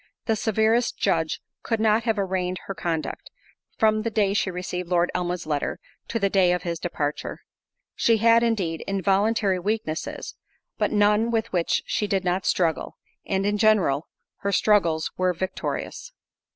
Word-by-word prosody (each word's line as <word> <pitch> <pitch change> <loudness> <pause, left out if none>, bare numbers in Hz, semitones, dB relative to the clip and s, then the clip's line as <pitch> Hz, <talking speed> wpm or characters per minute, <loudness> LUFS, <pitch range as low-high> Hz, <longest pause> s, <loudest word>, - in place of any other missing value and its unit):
The 225 - +2
severest 220 +2 +1
judge 160 -1 0 0.2
could 225 -2 -1
not 220 +1 +3
have 225 -2 +1
arraigned 185 -2 -1
her 195 - -4
conduct, 165 -4 -3 0.5
from 215 -1 +3
the 230 - -1
day 205 -2 +1
she 205 - +1
received 180 -1 -4
Lord 175 -1 +2
Elmwood's 180 0 -2
letter, 150 -2 -1 0.3
to 230 - -2
the 200 -3 +2
day 190 -2 +3
of 180 0 -2
his 170 -2 -3
departure. 150 -4 -3 0.5
She 230 -1 +3
had, 230 +1 +5
indeed, 195 -9 0
involuntary 195 +1 +1
weaknesses, 200 -4 -3 0.5
but - - +1
none 210 +2 +3
with 230 -1 -1
which 175 -2 +1
she 210 - -1
did 195 -1 0
not 180 +1 0
struggle, 165 -4 0 0.3
and, 195 0 0
in 205 0 0
general, 190 -10 +3 0.3
her 200 - -2
struggles 170 -7 +2
were 185 0 +2
victorious. 190 - -4
195 Hz, 155 wpm, -25 LUFS, 180-215 Hz, 0.5 s, had